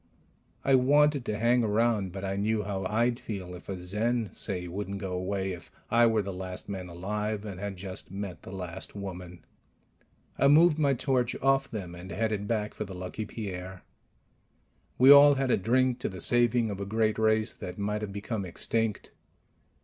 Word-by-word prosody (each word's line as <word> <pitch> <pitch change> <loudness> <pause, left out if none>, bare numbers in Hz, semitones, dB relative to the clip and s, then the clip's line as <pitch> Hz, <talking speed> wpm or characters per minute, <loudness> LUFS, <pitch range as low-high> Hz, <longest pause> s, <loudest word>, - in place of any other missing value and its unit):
I 135 - +4
wanted 140 +1 +4
to 105 - -2
hang 120 +2 +3
around, 110 -3 +1
but 95 +1 -6
I 95 0 -2
knew 105 +2 0
how 95 -1 -3
I'd 120 +3 +1
feel 95 -7 -6
if 90 - -11
a 95 -2 -4
Zen, 110 +5 -1
say, 90 -4 -3
wouldn't 100 +2 -4
go 95 -2 -4
away 95 +1 -2
if 90 -2 -9 0.2
I 120 +1 +6
were 110 -2 +2
the 100 0 -5
last 90 0 -7
man 95 -3 -5
alive 105 +4 -3
and 95 -3 -6
had 100 -1 -5
just 95 0 -7
met 100 -1 -6
the - - -10
last 95 0 -6
woman. 90 -3 -8 0.9
I 140 - +5
moved 155 +2 +6
my 140 -3 +3
torch 125 -1 0
off 135 0 +2
them 95 -7 -6
and 90 +2 -9
headed 105 +2 -1
back 105 -2 -1
for - - -4
the 95 -2 -8
Lucky 90 +4 -5
Pierre. 95 -4 -7 1.1
We 130 +2 +8
all 145 0 +9
had 135 -1 0
a - - +5
drink 125 +5 +2
to - - -2
the 95 - -8
saving 120 +2 +3
of 100 - -5
a 100 - -3
great 110 +1 +1
race 110 0 +2
that 90 0 -8
might 105 +1 -2
have 105 -2 -4
become 100 +1 -4
extinct. 110 +4 -2
105 Hz, 190 wpm, -28 LUFS, 95-120 Hz, 1.1 s, all